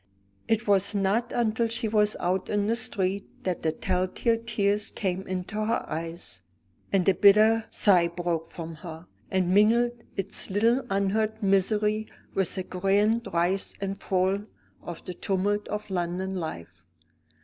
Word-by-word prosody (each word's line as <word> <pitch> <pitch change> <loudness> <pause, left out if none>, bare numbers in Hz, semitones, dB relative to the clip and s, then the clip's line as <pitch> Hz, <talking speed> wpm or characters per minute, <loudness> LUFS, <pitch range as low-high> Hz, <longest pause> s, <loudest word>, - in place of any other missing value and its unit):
It 225 0 0
was 200 +1 +2
not 205 +5 +1
until 230 -1 +1
she 230 0 -1
was 210 -1 +2
out 185 +2 -1
in 205 -1 +1
the 225 +2 +1
street 200 -4 -2
that 185 -2 -2
the 160 - +1
tell 185 +3 -1
tale 230 +4 0
tears 210 -3 0
came 190 -2 -2
into 185 +3 -3
her 230 +2 -1
eyes, 165 +1 -6 0.5
and 190 -3 +2
the 195 - +5
bitter 215 +4 +5
sigh 180 -5 +4
broke 170 -1 -3
from 165 -1 -8
her, 165 0 -9 0.2
and 185 -1 +1
mingled 230 +4 +4 0.3
its 195 - -3
little 230 +6 +2
unheard 210 +3 0
misery 210 +2 +2 0.3
with 190 -3 0
the 190 - -2
grand 205 +6 +1
rise 175 +3 0
and 195 0 -4
fall 190 +1 +1 0.4
of 175 -2 -8
the 180 - -5
tumult 200 +3 -1
of 210 0 -4
London 180 +1 -2
life. 90 - -6
195 Hz, 150 wpm, -27 LUFS, 180-215 Hz, 0.5 s, the